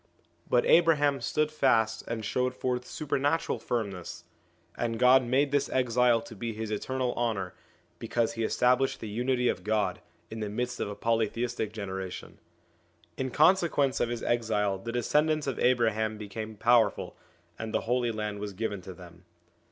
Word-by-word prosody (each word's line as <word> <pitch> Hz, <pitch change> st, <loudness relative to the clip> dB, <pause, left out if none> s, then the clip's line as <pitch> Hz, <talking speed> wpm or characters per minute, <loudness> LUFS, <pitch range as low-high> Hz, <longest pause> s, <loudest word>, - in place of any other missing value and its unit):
But 120 Hz, -, +3 dB
Abraham 145 Hz, -5 st, +4 dB
stood 150 Hz, +5 st, 0 dB
fast 115 Hz, -7 st, +2 dB
and 115 Hz, -2 st, -4 dB
showed 125 Hz, +4 st, -1 dB
forth 125 Hz, -1 st, -2 dB
supernatural 145 Hz, +1 st, -1 dB
firmness; 100 Hz, -7 st, -4 dB, 0.5 s
and 115 Hz, -1 st, -2 dB
God 130 Hz, +2 st, +6 dB
made 135 Hz, +4 st, +1 dB
this 145 Hz, -1 st, +1 dB
exile 125 Hz, -2 st, +3 dB
to 115 Hz, 0 st, -11 dB
be 115 Hz, +2 st, -4 dB
to -, -, -13 dB
his 110 Hz, -1 st, -4 dB
eternal 125 Hz, +4 st, -2 dB
honour, 110 Hz, -6 st, -2 dB, 0.5 s
because 115 Hz, -1 st, -1 dB
he 115 Hz, 0 st, -3 dB
established 125 Hz, +4 st, +2 dB
the 110 Hz, -, -6 dB
Unity 125 Hz, +3 st, 0 dB
of 90 Hz, -, -1 dB
God, 105 Hz, +1 st, 0 dB, 0.3 s
in 110 Hz, -, -6 dB
the 105 Hz, -1 st, -3 dB
midst 125 Hz, +3 st, -3 dB
of -, -, -2 dB
a 105 Hz, -, -6 dB
polytheistic 115 Hz, 0 st, -1 dB
generation. 95 Hz, -3 st, -6 dB, 0.8 s
In 130 Hz, 0 st, -2 dB
consequence 155 Hz, -4 st, +3 dB
of 115 Hz, -, +1 dB
his 120 Hz, -1 st, -4 dB
exile 105 Hz, -4 st, 0 dB
the 115 Hz, +4 st, -5 dB
descendants 150 Hz, +6 st, +1 dB
of 135 Hz, -, -3 dB
Abraham 110 Hz, -3 st, +2 dB
became 110 Hz, +1 st, -6 dB
powerful, 120 Hz, +1 st, +2 dB, 0.4 s
and 110 Hz, 0 st, -4 dB
the -, -, 0 dB
Holy 120 Hz, 0 st, 0 dB
Land 105 Hz, -2 st, -4 dB
was 105 Hz, -1 st, -5 dB
given 100 Hz, -1 st, -3 dB
to 90 Hz, 0 st, -9 dB
them. 90 Hz, -1 st, -14 dB
115 Hz, 160 wpm, -29 LUFS, 110-125 Hz, 0.8 s, God